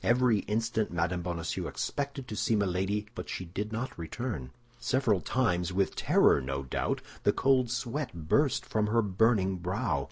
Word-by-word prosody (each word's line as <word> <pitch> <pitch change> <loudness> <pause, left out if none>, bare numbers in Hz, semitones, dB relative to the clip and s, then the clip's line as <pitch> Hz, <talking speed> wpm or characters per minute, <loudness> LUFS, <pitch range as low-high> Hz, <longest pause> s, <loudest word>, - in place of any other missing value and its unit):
Every 120 -2 +4
instant 110 0 0
Mme. 85 +1 0
Bonacieux 85 -2 -3
expected 140 -2 -3
to 110 - -5
see 110 - +1
Milady, 100 +1 0
but - - -7
she 90 - -4
did 105 +5 -4
not 115 +4 -3
return. 85 - -4 0.3
Several 120 -8 +2
times, 90 -9 +1
with 95 +1 0
terror, - - +4
no 70 +1 -3
doubt, 65 - -1 0.2
the - - +4
cold 130 -2 +3
sweat 120 - -3
burst 140 - +2
from 105 -1 0
her 115 +2 +3
burning 100 -1 +2
brow. 90 - -1
105 Hz, 160 wpm, -30 LUFS, 90-120 Hz, 0.3 s, Every